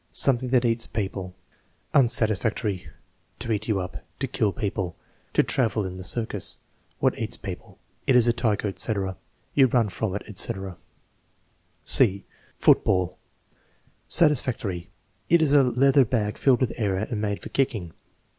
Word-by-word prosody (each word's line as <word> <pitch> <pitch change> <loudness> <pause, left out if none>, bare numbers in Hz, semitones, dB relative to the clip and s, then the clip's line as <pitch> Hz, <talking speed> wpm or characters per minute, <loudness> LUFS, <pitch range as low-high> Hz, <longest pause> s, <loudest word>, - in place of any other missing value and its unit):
"Something 130 -2 +3
that 125 -1 +2
eats 115 0 +1
people." 95 -3 -4 0.6
Unsatisfactory. 110 -5 +2 0.5
"To 115 0 -4
eat 110 0 -2
you 105 -4 0
up." 90 -1 -6
"To 135 - -2
kill 115 -5 0
people." 95 -5 -3 0.4
"To - - +4
travel 110 -5 0
in 95 - -5
the 95 0 -8
circus." 110 +5 0 0.4
"What - - 0
eats - - -3
people." - - -9 0.3
"It 130 - +4
is 120 -2 +5
a 120 - +3
tiger," 110 -3 0
etc. 95 -1 -2 0.4
"You 135 -2 +5
run 120 -3 +1
from 100 0 -3
it," 100 - -4
etc. 95 -2 -1 1.1
(c) 100 +1 +5 0.3
Football 90 -2 +2 0.9
Satisfactory. 120 - +2 0.4
"It 170 - +5
is 155 -3 +2
a 145 - +7
leather 135 +2 +4
bag 105 -3 -2
filled 130 -2 +3
with 130 - 0
air 105 -5 0
and 110 +2 -3
made 100 -1 -1
for - - -9
kicking." 110 -11 -1
110 Hz, 145 wpm, -25 LUFS, 95-125 Hz, 1.1 s, a